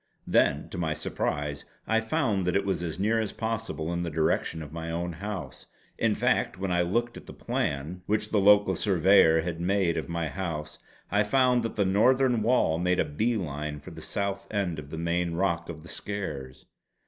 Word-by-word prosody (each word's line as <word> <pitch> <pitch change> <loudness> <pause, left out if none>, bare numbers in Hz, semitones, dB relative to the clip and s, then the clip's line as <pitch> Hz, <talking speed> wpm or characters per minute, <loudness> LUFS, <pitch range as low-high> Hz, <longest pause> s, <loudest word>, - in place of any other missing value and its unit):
Then 70 +1 +2
to 95 - -6
my 80 -3 0
surprise 75 -2 -3 0.2
I 115 0 +2
found 110 - 0
that 90 - +1
it 100 - +2
was 95 -3 -1
as 80 -2 -4
near 110 +3 +2
as 110 -2 -2
possible 110 -8 -3
in 85 - -1
the 85 - -2
direction 80 0 0
of 75 0 -10
my 80 0 -5
own 85 +1 -2
house. 85 -7 -6 0.3
In - - +2
fact - - +1
when 95 0 -2
I 90 0 +3
looked 120 +7 -1
at - - -12
the - - -9
plan 75 +6 -2
which 105 0 0
the 105 - +3
local 100 -1 +5
surveyor 90 -4 +4
had 85 0 -4
made 90 -2 +1
of 80 - -3
my 85 -1 -1
house 75 -4 -5 0.3
I 105 +2 +3
found 125 +3 +3
that 115 -1 -4
the 100 - +2
northern 120 +5 +3
wall 105 -9 +2
made 90 +1 +1
a - - +3
bee 110 +11 0
line 75 -4 -4
for - - -11
the - - -10
south 100 0 -3
end 95 -6 -1
of 70 -1 -9
the 80 - -6
main 85 +1 -1
rock 85 -2 0
of 80 -2 -7
the - - -12
Skares. 75 -11 -6
90 Hz, 205 wpm, -28 LUFS, 80-105 Hz, 0.3 s, local